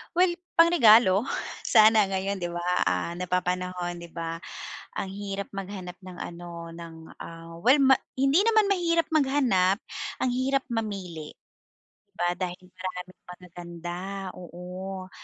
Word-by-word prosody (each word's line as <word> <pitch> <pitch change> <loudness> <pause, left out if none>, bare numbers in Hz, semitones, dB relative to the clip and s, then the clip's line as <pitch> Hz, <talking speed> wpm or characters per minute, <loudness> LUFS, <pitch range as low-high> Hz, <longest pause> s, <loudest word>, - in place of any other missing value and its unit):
Well 360 0 +5 0.2
pang 335 +1 +7
regalo, 225 - +6 0.4
sana 215 -2 +6
ngayon 195 0 -2
'di 175 - -2
ba, 175 0 -4 0.2
ah, 90 - 0
napapanahon, 180 -1 -2
'di 170 - -9
ba? 165 0 -4 0.6
Ang 190 - -3
hirap 200 0 -5
maghanap 190 -2 -6
ng 185 -1 -9
ano 170 -1 -7
ng, 165 -1 -9 0.2
ah, 165 0 -9
well 250 +9 +6
ma 265 0 +6 0.2
hindi 275 +5 +4
naman 435 -3 +4
mahirap 335 -3 +2
maghanap, 265 -11 +3 0.5
ang 255 - +2
hirap 265 +2 +1
mamili, 190 -9 -4 0.7
'di - - -46
ba? 175 +1 +1
Dahil 180 -1 -4
maraming 185 0 -8
magaganda, 175 -1 -8 0.4
oo. 185 +2 -7
185 Hz, 130 wpm, -27 LUFS, 175-225 Hz, 0.7 s, pang